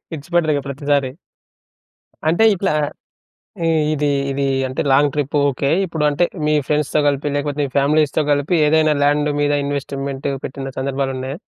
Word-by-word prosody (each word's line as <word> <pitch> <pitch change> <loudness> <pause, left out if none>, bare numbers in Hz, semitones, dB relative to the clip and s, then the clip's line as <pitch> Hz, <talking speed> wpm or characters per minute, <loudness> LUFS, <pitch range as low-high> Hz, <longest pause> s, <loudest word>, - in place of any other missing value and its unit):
ఇడ్చిపెట్టరు 160 +1 0
ఇక 140 - -1
ప్రతిసారి. 140 -1 0 1.2
అంటే 170 +7 +2
ఇట్లా 190 -1 -1 1.0
ఇ - - +2 0.3
ఇది 150 0 0 0.2
ఇది 140 +1 -1 0.2
అంటే 130 - -2
లాంగ్ 145 +1 +4
ట్రిప్పు 145 0 -1
ఓకే. 140 +1 -2 0.2
ఇప్పుడు 160 -3 -2
అంటే 160 +5 +1 0.2
మీ 150 - +2
ఫ్రెండ్స్‌తో 150 0 +1
కలిపి, 145 +1 -1
లేకపోతే 145 0 -2
మీ - - -3
ఫ్యామిలీస్‌తో 150 +2 +2
కలిపి 145 +5 0
ఏదైనా 155 0 +3
ల్యాండు 145 +1 +2
మీద 145 0 +2
ఇన్వెస్ట్‌మెంట్ 140 -1 -4 0.2
పెట్టిన 135 0 -5
సందర్భాలున్నయా? 135 0 -3
145 Hz, 140 wpm, -19 LUFS, 140-150 Hz, 1.2 s, లాంగ్